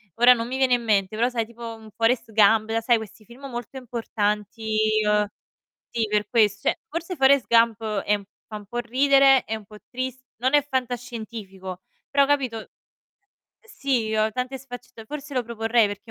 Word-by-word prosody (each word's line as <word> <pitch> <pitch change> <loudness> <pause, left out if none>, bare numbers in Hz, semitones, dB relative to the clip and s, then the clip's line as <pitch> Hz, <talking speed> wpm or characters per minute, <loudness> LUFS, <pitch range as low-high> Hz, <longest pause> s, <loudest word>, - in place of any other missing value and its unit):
ora 240 +2 +7
non 230 -1 -3
mi 255 - -4
viene 260 -2 +4
in 240 - -4
mente 205 -2 +1
però, 240 +2 +3
sai, 230 -3 -2
tipo, 235 0 -8
un 220 -1 -14
"Forrest 230 0 +1
Gump", 215 +1 +4
la 225 0 0
sai 235 +1 +3
questi 220 0 -10
film 245 +5 -13
molto 240 +1 -7
importanti. 220 -2 -2 0.3
Uhm, 210 0 +2 0.7
sì, 225 -2 +1
per 210 -1 0
ques 215 -3 +3
cioè - - +1
forse 335 +2 -4
"Forrest 270 -1 +5
Gump" 230 -1 +3 0.2
è 210 0 +1 0.3
fa 215 - -6
un 205 - -12
po' 240 - -6
ridere, 270 +2 +4
è 220 - -3
un 215 -2 -9
po' 210 +1 -13
tris 255 0 -5
non 260 +5 0
è 290 -1 +4
fantascientifico, 225 -7 -5 0.3
però, 280 0 +4
capito, 260 -6 -1 0.9
sì, 270 - -2
ehm, 215 0 +2
tante 255 +3 -3
sfaccetta 245 -3 -11
forse 295 +3 -7
lo 250 -2 0
proporrei 225 -1 +1
perché 205 0 -7
230 Hz, 180 wpm, -24 LUFS, 215-255 Hz, 0.9 s, ora